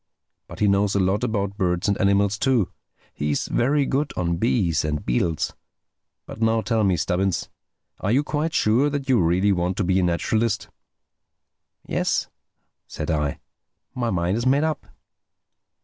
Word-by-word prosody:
But - - -11
he 105 - +4
knows 100 0 +2
a - - +3
lot 95 +4 +1
about 100 -4 -1
birds 90 -3 0
and 100 - +2
animals 100 +1 +2
too. 125 -8 +2 0.4
He's 75 0 -1
very 140 +3 +2
good 140 +3 -1
on 85 -1 0
bees 90 -6 +1
and 75 -1 -2
beetles—But 80 - -5
now 110 0 +2
tell 110 -1 0
me, 95 -3 +2
Stubbins, 90 +4 -1 0.5
are 100 - -1
you 135 +5 +3
quite 155 +2 -2
sure 120 +7 +3
that 145 -1 -3
you 130 -6 +3
really 90 +4 +2
want 90 0 0
to - - +1
be 95 +1 +2
a - - +1
naturalist?" 110 +5 0 1.2
"Yes," - - -1 0.6
said - - -4
I, 75 -2 -1 0.5
"my 120 -2 -1
mind 90 +1 0
is 120 - -2
made 140 +3 +3
up." 155 -3 -2
100 Hz, 155 wpm, -23 LUFS, 90-120 Hz, 1.2 s, he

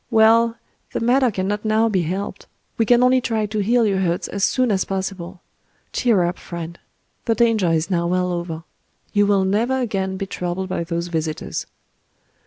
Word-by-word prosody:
Well, 230 +1 +4 0.4
the - - -1
matter 250 +2 +3
cannot 205 +1 -2
now 220 +1 +2
be 195 -5 +1
helped;—we 195 +5 -4
can 245 0 +5
only 255 0 +4
try 220 -3 0
to 215 +1 -3
heal 230 +3 +3
your 195 -2 +1
hurts 175 -2 0
as 200 -1 -3
soon 255 0 +2
as 190 -2 +2
possible... 190 -2 -5 0.5
Cheer 225 -7 +3
up, 175 +1 -2
friend!—the 170 +6 -6
danger 225 -6 +3
is 165 +2 0
now 170 -1 +1
well 180 0 0
over. 170 -2 -4 0.5
You 205 0 +3
will 200 -2 +3
never 230 +7 +1
again 190 -6 -2
be 195 - -3
troubled 185 0 -4
by 185 - -1
those 170 +1 -3
visitors." 160 -2 -3
195 Hz, 170 wpm, -21 LUFS, 175-225 Hz, 0.5 s, can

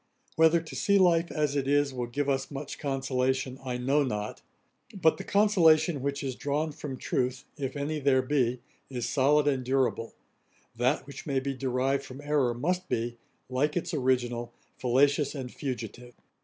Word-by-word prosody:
Whether 160 +1 +5
to 160 - -10
see 200 0 +3
life 170 -3 +3
as 150 -2 0
it 135 -2 0
is, 145 -1 +2
will 125 -2 -3
give 140 +4 -2
us 135 -1 0
much 140 0 -6
consolation, 130 -1 -1
I 125 -2 -3
know 135 +4 +2
not; 105 -5 -4 0.6
but 160 -2 +4
the - - -6
consolation 175 -7 +4
which 140 +1 -2
is 135 -1 -2
drawn 145 +4 -1
from 145 -2 -6
truth, 125 0 -2
if 140 -1 -4
any 150 +2 -2
there 135 -2 +3
be, 125 -3 +1 0.3
is 125 -3 -3
solid 145 +2 +3
and 135 -3 +1
durable; 130 -3 0 0.6
that 125 +2 +1
which 140 +3 -10
may 135 -2 +1
be 135 +1 -3
derived 135 +1 0
from 135 0 -10
errour 145 -5 +1
must 180 +8 -1
be, 120 +1 -2 0.3
like 145 +5 0
its 170 0 -3
original, 125 -4 0 0.3
fallacious 140 +4 +2
and 130 -3 -6
fugitive. 125 -2 -6
135 Hz, 170 wpm, -28 LUFS, 125-150 Hz, 0.6 s, Whether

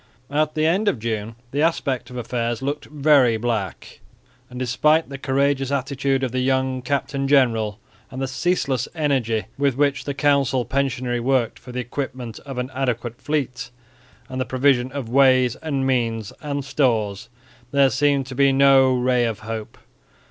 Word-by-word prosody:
At 155 +1 0
the 155 0 +1
end 190 +7 +2
of 200 - +2
June 110 0 -4 0.2
the 145 - -1
aspect 140 -6 0
of 125 - -8
affairs 120 0 -2
looked 145 +2 -3
very 140 -5 +3
black, 110 -5 -3 0.5
and 125 - -10
despite 150 +6 +2
the 135 -1 -7
courageous 135 0 +1
attitude 135 0 0
of 130 - -1
the 130 - -1
young 130 0 0
captain 135 0 -2
general, 115 -6 +2 0.3
and 130 - -7
the 135 - -1
ceaseless 135 -3 0
energy 130 -8 0 0.2
with 140 -3 +1
which 140 -2 +1
the 140 - -3
council 140 -3 +2
pensionary 130 -3 -1
worked 120 -1 0
for 125 - -11
the 125 +1 -3
equipment 125 -2 -5
of 135 -2 -6
an 125 +1 -3
adequate 120 -3 -3
fleet, 135 -5 -2 0.6
and 130 -1 -4
the - - -1
provision 130 -1 +2
of 135 -3 -5
ways 130 -1 +4
and 140 -4 -2
means 115 -5 -1
and 145 -2 -3
stores, 115 -6 0 0.4
there 140 -1 +3
seemed 140 0 +2
to 130 - -8
be 140 +1 +4
no 135 -1 +5
ray 125 -1 +2
of 115 -2 -3
hope. 110 0 -6
130 Hz, 165 wpm, -22 LUFS, 120-140 Hz, 0.6 s, no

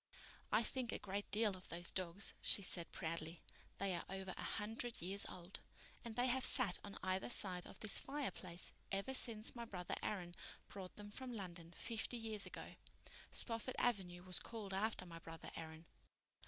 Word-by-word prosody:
"I - - +6
think 245 -1 0
a - - 0
great 200 +1 -2
deal 210 -2 +4
of 185 - -10
those 170 0 +4
dogs," 185 +1 0
she 200 - +4
said 175 -2 +2
proudly. 165 0 -3 0.3
"They 195 -1 +1
are 170 - -1
over 190 -1 -2
a - - -5 0.2
hundred 225 +3 -2
years 195 +4 +4
old, 180 +2 -7 0.4
and 230 -2 -4
they 245 - +4
have 260 +1 +3
sat 235 -9 +4
on 200 -1 -6
either 185 +3 +1
side 185 -6 +3
of - - -10
this 215 - +5
fireplace 255 -11 -1 0.2
ever 200 +7 +1
since 230 -3 +2
my 235 - -3
brother 180 -5 -3
Aaron 180 -5 -1 0.4
brought 190 -2 -6
them 205 0 -7
from 250 +2 -2
London 175 -4 -5
fifty 230 +1 -1
years 220 -3 +3
ago. - - -7 0.5
Spofford 230 +1 0
Avenue 180 -7 +2
was 180 -1 +1
called 215 -4 -5
after 200 -1 +1
my 165 -1 -7
brother 165 0 -7
Aaron." 160 0 -6
195 Hz, 175 wpm, -42 LUFS, 180-225 Hz, 0.5 s, I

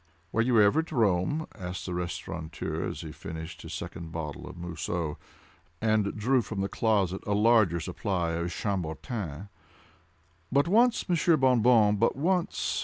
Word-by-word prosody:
"Were 115 - +2
you 120 -1 +3
ever 105 +9 +5
at 160 - -3
Rome?" 115 - +1
asked 90 +1 -6
the 90 - -4
restaurateur, 85 -2 -4
as - - -6
he - - -7
finished 80 +1 -8
his - - -7
second 85 -1 -7
bottle 80 -3 -5
of - - -11
Mousseux, 85 -2 -3 0.6
and 110 -1 +1
drew 125 +4 +3
from 105 -3 -4
the 100 - 0
closet 100 -3 +1
a 105 - +1
larger 105 -5 +4
supply 85 0 -2
of 85 +1 -2
Chambertin. 95 - -4 1.0
"But 140 +4 +3
once, 235 +6 +3
Monsieur 170 -2 +3
Bon 130 -4 +4
Bon, 110 -3 +5
but 115 +3 +2
once. 180 +5 0
100 Hz, 155 wpm, -28 LUFS, 85-120 Hz, 1.0 s, ever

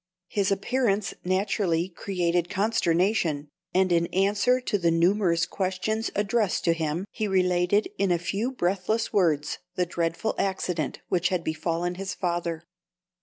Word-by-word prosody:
His 200 -1 0
appearance 205 0 0
naturally 185 -2 +1
created 175 -2 -1
consternation, 180 -6 +1 0.2
and 185 0 +2
in 170 0 +3
answer 205 +7 +2
to 235 -5 -1
the 170 -2 +2
numerous 170 +1 +3
questions 195 +4 -2
addressed 210 -1 +1
to 170 - +4
him 165 +2 -2
he 215 - -2
related 180 +1 +2
in 195 -1 +2
a 175 - +3
few 200 +8 -2
breathless 200 0 -1
words 155 -7 +1 0.2
the 180 - +1
dreadful 170 +4 -1
accident 180 -6 -1
which 180 0 +2
had 180 -3 -1
befallen 165 +2 -1
his 190 -2 -4
father. 170 -2 -2
185 Hz, 135 wpm, -26 LUFS, 170-200 Hz, 0.2 s, to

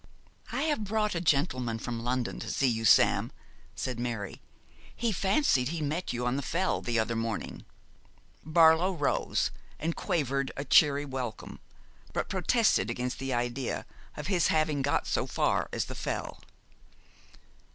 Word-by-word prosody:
'I - - -1
have 300 -8 0
brought 210 +1 0
a 170 - -2
gentleman 130 -7 +1
from 115 0 -5
London 125 0 -1
to 115 - -6
see 135 - +1
you, 115 -2 0
Sam,' 95 - +5 0.4
said 125 -2 -3
Mary. 115 -5 -4 0.5
'He 235 -1 0
fancied 190 - +2
he 165 +3 -3
met 155 +4 -2
you 120 0 -3
on 125 +2 0
the - - -1
Fell 180 +7 0
the 120 -1 -1
other 115 +1 0
morning.' 115 -1 -4 0.8
Barlow 160 +3 +5
rose 150 -5 0 0.3
and 165 +2 -2
quavered 140 -7 -1
a 140 - -3
cheery 145 0 +5
welcome, 130 -5 -5 0.5
but - - -2
protested 95 - +2
against 125 +1 -3
the 135 0 -3
idea 120 +1 -2 0.3
of - - -5
his 185 -3 +2
having 155 -2 +1
got 140 +1 +1
so - - -1
far - - 0
as - - -1
the - - -7
Fell. - - -4
140 Hz, 150 wpm, -29 LUFS, 120-165 Hz, 0.8 s, Sam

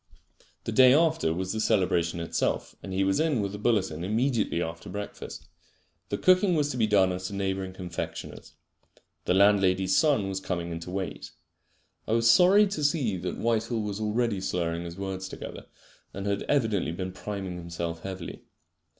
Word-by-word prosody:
The - - -3
day 130 0 +7
after 160 - +2
was 95 +4 -2
the 110 - -2
celebration 90 -6 +1
itself, 85 - -1
and 95 - -7
he 95 +1 +1
was 95 0 +1
in 155 -6 +2
with 100 -1 -2
a 105 - -6
bulletin 95 -8 0
immediately 110 -1 0
after 80 -1 -5
breakfast. 105 0 -7 0.6
The 100 - -1
cooking 185 - +4
was 145 -2 +1
to 125 - -4
be 110 -2 +2
done 95 -3 +4
at 95 +1 -4
a 100 - -6
neighbouring 95 -1 -2
confectioner's. 90 -2 -6 0.7
The 90 - +2
landlady's 95 -1 +4
son 140 -9 +3
was 95 -1 -2
coming 85 -3 -3
in 85 - -4
to 85 - -8
wait. 95 0 -4 0.8
I 110 - 0
was 115 0 +3
sorry 185 - +7
to 190 -7 -3
see 140 - +1
that 90 0 -4
Whitehall 115 0 0
was 105 -1 -4
already 110 -1 0
slurring 85 -2 -2
his 85 +1 -8
words 95 -1 -4
together, - - -8 0.5
and 100 0 -5
had 100 0 0
evidently 110 - +1
been 95 +1 -4
priming 95 -2 -5
himself 85 -1 -5
heavily. 95 -2 -7
100 Hz, 175 wpm, -27 LUFS, 90-115 Hz, 0.8 s, day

